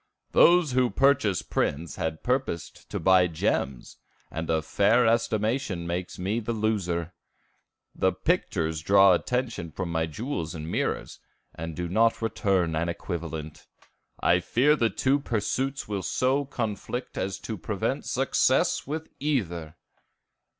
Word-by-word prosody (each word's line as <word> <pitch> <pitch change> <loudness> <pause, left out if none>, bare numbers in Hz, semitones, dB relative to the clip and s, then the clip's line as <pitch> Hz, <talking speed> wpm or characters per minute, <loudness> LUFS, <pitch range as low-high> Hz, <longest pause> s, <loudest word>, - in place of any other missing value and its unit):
"Those 175 -4 +5
who 125 -1 +3
purchased 130 -9 +2
prints 80 +1 -1
had 80 -1 -3
purposed 125 -9 -2
to - - -3
buy 95 -1 +5
gems, 70 -5 -2 0.3
and 80 0 -4
a 80 -1 +1
fair 115 +8 +3
estimation 110 -4 0
makes 90 +1 -4
me 100 +5 -1
the 115 +1 -3
loser. 90 -6 -1 0.8
The 95 - +2
pictures 85 - -1
draw 95 +2 +6
attention 120 -3 -1
from 90 +1 -4
my 80 -1 0
jewels 85 - -4
and 80 +1 -6
mirrors, - - -2 0.3
and 80 0 -6
do 90 +1 -3
not 115 +6 +2
return 95 -7 0
an 85 +2 0
equivalent. 80 -3 -5 0.5
I - - +4
fear 145 +5 +3
the 115 -6 +2
two 135 +5 +1
pursuits 130 +2 -2
will 100 -2 -2
so 130 +8 +1
conflict 120 -1 -4
as 95 0 -2
to 110 - -4
prevent 90 - -2
success - - +2
with 155 +2 -4
either!" 85 - -2
100 Hz, 135 wpm, -27 LUFS, 85-125 Hz, 0.8 s, draw